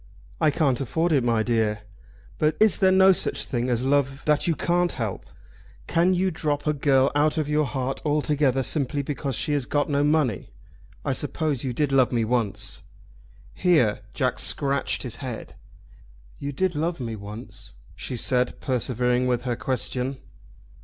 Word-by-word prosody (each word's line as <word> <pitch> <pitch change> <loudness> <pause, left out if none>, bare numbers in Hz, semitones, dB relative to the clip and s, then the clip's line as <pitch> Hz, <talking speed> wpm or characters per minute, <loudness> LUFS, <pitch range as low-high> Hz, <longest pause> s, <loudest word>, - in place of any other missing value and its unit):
"I 155 - +4
can't 140 -4 +1
afford 160 +7 0
it, 140 -5 +3
my 115 -2 +2
dear." 110 -3 0 0.6
"But 155 0 +1
is 215 -2 +5
there 190 -1 +5
no 190 +1 +6
such 185 - -1
thing 120 0 -2
as 120 0 0
love 135 0 0
that 150 +1 +2
you 165 - +2
can't 175 +3 +1
help? 110 -6 -4 0.6
Can 175 +3 +2
you 185 +1 +1
drop 150 -3 -2
a 150 - +2
girl 135 -2 +3
out 150 +2 +2
of 155 -2 0
your 150 0 +1
heart 135 -1 -3
altogether 145 -3 +1
simply 140 0 -1
because 140 -2 -3
she 150 - -1
has 140 -4 -1
got 145 0 0
no 140 0 +2
money? 145 -8 +1 0.6
I - - +1
suppose 150 -5 -1
you 130 - -2
did 145 +3 0
love 130 -2 +4
me 115 -3 +1
once?" 115 -3 -2 0.7
Here 155 - +2
Jack - - 0
scratched 140 -1 0
his 120 -3 -6
head. 125 -5 -7 0.9
"You 140 - -4
did 185 +6 0
love 165 +2 -2
me 115 -3 -4
once?" 105 - -9 0.2
she 120 +5 -5
said, 125 +1 +1
persevering 125 0 0
with 125 -1 0
her 125 -2 -1
question. 130 +1 -3
140 Hz, 165 wpm, -25 LUFS, 125-150 Hz, 0.9 s, no